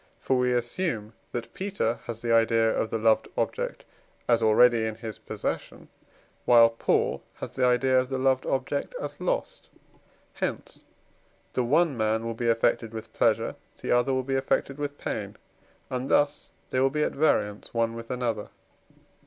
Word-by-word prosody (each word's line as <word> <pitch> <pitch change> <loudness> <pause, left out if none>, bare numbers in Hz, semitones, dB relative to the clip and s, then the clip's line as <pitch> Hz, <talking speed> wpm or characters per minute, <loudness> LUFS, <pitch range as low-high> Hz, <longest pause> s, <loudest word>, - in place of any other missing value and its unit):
For 135 - 0
we 125 0 +2
assume 120 - -2 0.2
that 120 -1 -5
Peter 190 - -2
has 115 0 -6
the 115 -1 +1
idea 115 0 +4
of 110 - -1
the - - -1
loved 110 0 +3
object - - -2 0.4
as 115 -1 +3
already 115 +1 +5
in 110 -1 -2
his 110 -1 -7
possession, - - -5 0.5
while 115 -1 +7
Paul 115 - 0
has - - -7
the 125 -1 +1
idea 130 +1 +3
of 130 0 -2
the 135 - -1
loved 130 0 +1
object 140 - -2
as - - -6
lost. - - -2 0.6
Hence - - -4 0.7
the 125 - +1
one 150 +4 +3
man 110 0 0
will 115 - -2
be 115 +1 -1
affected 115 0 +1
with 110 0 -8
pleasure, - - +1 0.2
the - - -3
other 120 +2 +3
will 130 0 0
be 135 +1 -3
affected 135 +1 0
with 145 0 -4
pain, - - -4 0.5
and 130 +1 -3
thus 145 0 +2 0.2
they 130 - +1
will 135 +1 +4
be 150 +2 0
at - - 0
variance 105 -9 +1
one 115 -1 0
with 115 0 -8
another. 120 -4 -2
120 Hz, 170 wpm, -27 LUFS, 115-135 Hz, 0.7 s, while